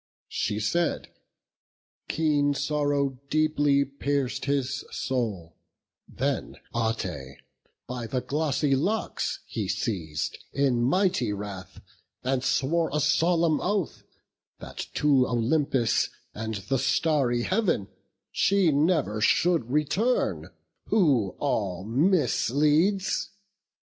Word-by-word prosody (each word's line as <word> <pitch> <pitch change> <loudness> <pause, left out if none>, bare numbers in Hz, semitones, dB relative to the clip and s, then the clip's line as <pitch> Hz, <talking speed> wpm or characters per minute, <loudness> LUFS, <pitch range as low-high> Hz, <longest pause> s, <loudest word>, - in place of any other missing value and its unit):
She 105 0 -1
said: 170 +11 0 1.0
keen 145 -2 +1
sorrow 145 -2 0
deeply 145 -2 +2
pierc'd 140 -1 -2
his 140 0 -1
soul; 105 - -3 0.5
Then - - -3 0.2
Ate 90 - -2 0.5
by 125 -2 -5
the 130 +3 -1
glossy 145 -1 0
locks 200 +11 -1
he - - -4
seiz'd 80 -9 -3
In 135 -3 +2
mighty 135 - +2
wrath; 100 -2 -7 0.4
and 130 0 0
swore 160 +6 +1
a 150 - 0
solemn 160 +2 +2
oath, 195 -3 -1 0.6
That - - -7
to 140 -4 +3
Olympus 125 +1 +1 0.2
and 110 0 -4
the 105 +7 -2
starry 135 -3 +1
Heav'n 175 - 0 0.4
She 195 -4 +3
never 145 - +1
should 160 +3 +2
return, 155 - 0 0.4
who 135 - +2
all 95 -10 -1
misleads. 155 - +2
140 Hz, 95 wpm, -26 LUFS, 115-155 Hz, 1.0 s, to